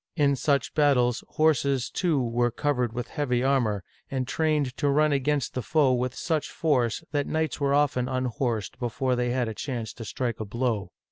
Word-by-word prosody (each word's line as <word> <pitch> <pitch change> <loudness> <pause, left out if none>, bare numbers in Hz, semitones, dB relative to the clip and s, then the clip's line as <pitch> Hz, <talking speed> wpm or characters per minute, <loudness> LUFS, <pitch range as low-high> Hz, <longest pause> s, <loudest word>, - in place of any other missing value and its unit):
In 145 -4 +3
such 140 0 0
battles, 130 -5 +3
horses, 140 -5 +1
too, 170 -6 +1
were 120 0 +1
covered 125 -1 0
with 120 0 -5
heavy 125 -5 0
armor, 120 -8 +1 0.3
and 130 -2 -2
trained 150 -4 0
to 145 - +1
run 150 +2 +3
against 140 -1 0
the 125 - -2
foe 145 0 +3
with 125 0 -1
such 160 -3 -1
force 130 -4 0
that 145 -2 0
knights 160 -2 -1
were 140 0 +2
often 130 -4 +1
unhorsed 125 -4 -2
before 125 +1 0
they 125 0 0
had 125 -1 0
a 110 - -3
chance 115 -2 -4
to 115 - -8
strike 120 +2 -3
a 110 - -3
blow. 110 -3 -1
130 Hz, 185 wpm, -26 LUFS, 120-145 Hz, 0.3 s, In